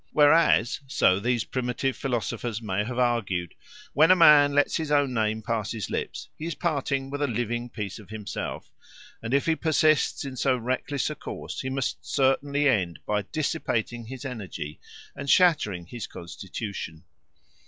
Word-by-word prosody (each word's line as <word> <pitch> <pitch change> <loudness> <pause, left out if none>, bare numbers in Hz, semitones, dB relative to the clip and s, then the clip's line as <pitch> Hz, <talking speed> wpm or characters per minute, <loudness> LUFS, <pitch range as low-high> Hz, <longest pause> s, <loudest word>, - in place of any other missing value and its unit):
Whereas, 150 -5 +4
so 95 -8 +3
these 120 +1 0
primitive 130 +1 -2
philosophers 120 -3 -2
may 105 -2 -1
have 120 +3 -5
argued, 110 -9 0 0.4
when 155 +3 +5
a 185 - +8
man 150 -4 +7
lets 145 0 +3
his 160 -2 -3
own 145 -3 +3
name 110 -1 0
pass 110 -2 -2
his 105 -6 -5
lips, - - -4
he 160 - -6
is 170 - -3
parting 140 -4 -1
with 145 +1 -4
a 145 - +2
living 120 0 -2
piece 105 -4 -5
of 105 - -14
himself, 110 -2 -6 0.5
and 115 - -5
if 140 +1 +2
he 165 - +2
persists 155 -2 +2
in 135 -1 -6
so 130 -1 +2
reckless 130 +4 -2
a - - -5
course - - -6
he 130 - -3
must 130 -4 -2
certainly 140 +2 +1
end 95 -10 +1
by 105 0 0
dissipating 120 -7 -2
his 130 +3 -8
energy 95 - -6 0.4
and 140 0 -6
shattering 145 - +3
his 115 +4 -7
constitution. 90 -1 -7
125 Hz, 165 wpm, -26 LUFS, 110-145 Hz, 0.5 s, a